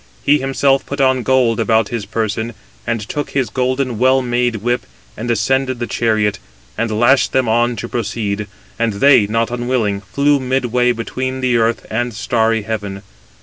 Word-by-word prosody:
He 145 +1 +4
himself 135 0 +1
put 140 - -6
on 130 -1 +3
gold 125 -3 +2
about 110 -2 +2
his 115 -4 -4
person, 110 +1 -2 0.3
and 115 -2 -1
took 145 +4 -3
his 130 -6 -1
golden 130 -2 -1
well 130 +1 +3
made 120 -1 0
whip, 120 - -2 0.3
and 120 +2 -5
ascended 130 +3 +1
the 120 - -3
chariot; 110 -4 0 0.4
and 115 - -1
lashed 130 +3 +4
them 130 -2 +2
on 120 +2 +2
to 115 +2 -5
proceed, 105 -3 -3 0.3
and 115 -2 +1
they, 110 0 +5
not 115 +2 0
unwilling, 120 -5 -1
flew 140 +9 +1
midway 125 -1 +1
between 130 +3 -3
the 125 -2 +1
earth 115 0 0
and 120 +1 -2
starry 115 -1 +1
heaven. 100 -2 -5
120 Hz, 165 wpm, -17 LUFS, 110-130 Hz, 0.4 s, they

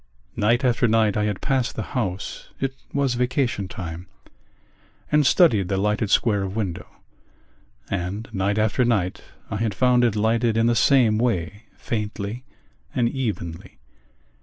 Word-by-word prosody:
Night 120 +5 +2
after 125 -1 +3
night 110 -2 +2
I 105 - +1
had 105 -3 -2
passed 130 -3 0
the 110 - -3
house 100 -7 -3
(it 135 0 -1 0.2
was 140 -3 +1
vacation 125 -4 0
time) 90 -1 -7 1.0
and 150 -2 +4
studied 110 - +4
the 95 - -1
lighted 105 +2 0
square 105 -1 +3
of 95 0 -4
window: 95 -6 -3 1.0
and 95 +5 -3
night 100 +2 0
after 110 +3 +2
night 105 -7 0 0.3
I - - -1
had 110 -2 -1
found 125 0 +3
it 115 -3 +2
lighted 115 +1 +1
in 115 - +3
the 120 0 +3
same 115 -3 +4
way, 105 -2 -1
faintly 105 +1 -4 0.5
and 120 -2 +2
evenly. 105 - -4
110 Hz, 145 wpm, -23 LUFS, 100-120 Hz, 1.0 s, and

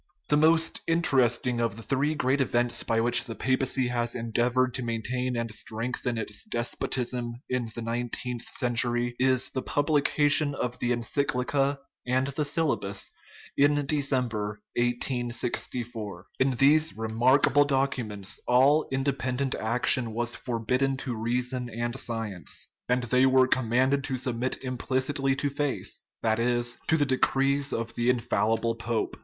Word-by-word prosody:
The 150 - +4
most 160 +1 +3
interesting 125 -7 +2
of 115 -3 0
the 115 - -9
three 145 +5 0
great 135 0 +1
events 120 -2 +1
by 115 0 0
which 120 +1 +3
ttie 115 - -7
papacy 130 -1 0
has 120 -1 -2
endeavored 120 +2 +1
to 130 - -1
maintain 120 +2 -2
and 115 -1 -2
strengthen 120 +2 -2
its 105 -2 -4
despotism 120 0 -2
in 125 -2 -2
the 120 - -5
nineteenth 120 +1 -2
century 120 0 +1
is 130 -1 +2
the 130 - -2
publication 145 0 +2
of 125 -1 -3
the 120 - -1
encyclica 135 +3 0 0.3
and 130 +1 +2
the 145 +2 -1
syllabus 145 -10 -1 0.4
in 145 0 +3
December, 125 -8 -1
1864. 120 -4 -2
In 130 -1 +2
these 155 +4 +4
remarkable 125 +6 +3
documents 130 -8 -2
all 135 +5 +4
independent 135 0 -1
action 115 +1 +1
was 120 +1 -1
forbidden 125 +3 -1
to 130 -3 -4
reason 125 +2 -2
and 120 +1 -3
science, 110 -7 -4 0.2
and 125 0 +2
they 125 +2 +3
were 130 -1 +5
commanded 130 +3 +2
to 130 -2 -2
submit 125 +1 -2
implicitly 130 +2 0
to 140 +1 -1
faith 145 -1 -3 0.3
that 110 0 +1
is, 120 0 0
to 160 - +3
the 145 - +2
decrees 135 +1 +1
of 115 0 -3
the 120 +1 0
infallible 115 -1 +1
pope. 115 0 -2
125 Hz, 140 wpm, -27 LUFS, 120-135 Hz, 0.4 s, were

